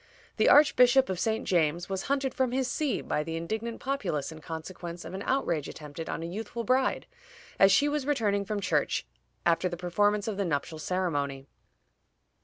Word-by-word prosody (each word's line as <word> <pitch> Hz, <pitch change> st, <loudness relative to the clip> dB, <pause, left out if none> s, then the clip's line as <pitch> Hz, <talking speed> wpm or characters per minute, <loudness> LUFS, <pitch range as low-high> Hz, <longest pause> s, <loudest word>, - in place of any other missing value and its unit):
The -, -, +4 dB
Archbishop 265 Hz, -3 st, +6 dB
of 185 Hz, -2 st, -2 dB
St. 220 Hz, +3 st, 0 dB
James 170 Hz, -1 st, +1 dB
was 190 Hz, -1 st, -2 dB
hunted 275 Hz, -1 st, 0 dB
from 260 Hz, -2 st, 0 dB
his 260 Hz, -1 st, +1 dB
see 290 Hz, +1 st, -1 dB
by -, -, -1 dB
the 165 Hz, +2 st, -4 dB
indignant 220 Hz, +8 st, -4 dB
populace 260 Hz, -, -2 dB
in 160 Hz, 0 st, -10 dB
consequence 170 Hz, +2 st, -7 dB
of 165 Hz, -, -8 dB
an 190 Hz, -, -5 dB
outrage 170 Hz, -, 0 dB
attempted 150 Hz, +2 st, -8 dB
on 165 Hz, -, -3 dB
a -, -, -3 dB
youthful 220 Hz, +6 st, -5 dB
bride 255 Hz, +4 st, +1 dB, 0.5 s
as 195 Hz, 0 st, +7 dB
she 285 Hz, +9 st, +4 dB
was 290 Hz, -2 st, -1 dB
returning 210 Hz, -8 st, +1 dB
from 205 Hz, 0 st, -3 dB
church -, -, 0 dB, 0.4 s
after 170 Hz, +2 st, +2 dB
the 175 Hz, -, -5 dB
performance 205 Hz, +4 st, +1 dB
of 215 Hz, -3 st, -2 dB
the 200 Hz, -, 0 dB
nuptial 155 Hz, 0 st, -2 dB
ceremony. 145 Hz, -7 st, -2 dB
195 Hz, 180 wpm, -29 LUFS, 165-245 Hz, 0.5 s, as